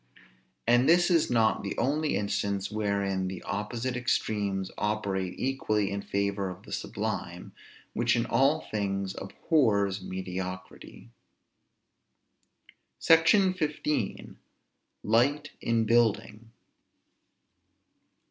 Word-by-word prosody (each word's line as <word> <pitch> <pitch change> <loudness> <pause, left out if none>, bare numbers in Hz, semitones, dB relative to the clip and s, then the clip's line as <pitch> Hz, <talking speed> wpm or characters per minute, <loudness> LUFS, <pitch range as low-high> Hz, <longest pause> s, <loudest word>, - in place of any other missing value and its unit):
And 120 +4 +4
this 175 +2 +5
is 165 -3 +3
not 115 -2 +2
the 100 - -5
only 150 +3 0
instance 100 -1 -1
wherein 100 -3 -1
the 95 -1 -6
opposite 120 +4 -3
extremes 100 -6 -1
operate 100 -3 -2
equally 110 -7 0
in 100 0 -3
favor 100 -1 -1
of 90 +2 -9
the - - -13
sublime, - - -4 0.4
which 115 +1 +2
in 115 0 0
all 135 +7 +2
things 100 -2 -3
abhors 100 - +1
mediocrity. 95 -7 -7 1.9
SECTION 185 +4 +5
XV. 150 - -2 0.7
LIGHT 140 +7 +2
IN 115 -1 +1
BUILDING. 115 -1 +1
110 Hz, 95 wpm, -28 LUFS, 100-130 Hz, 1.9 s, this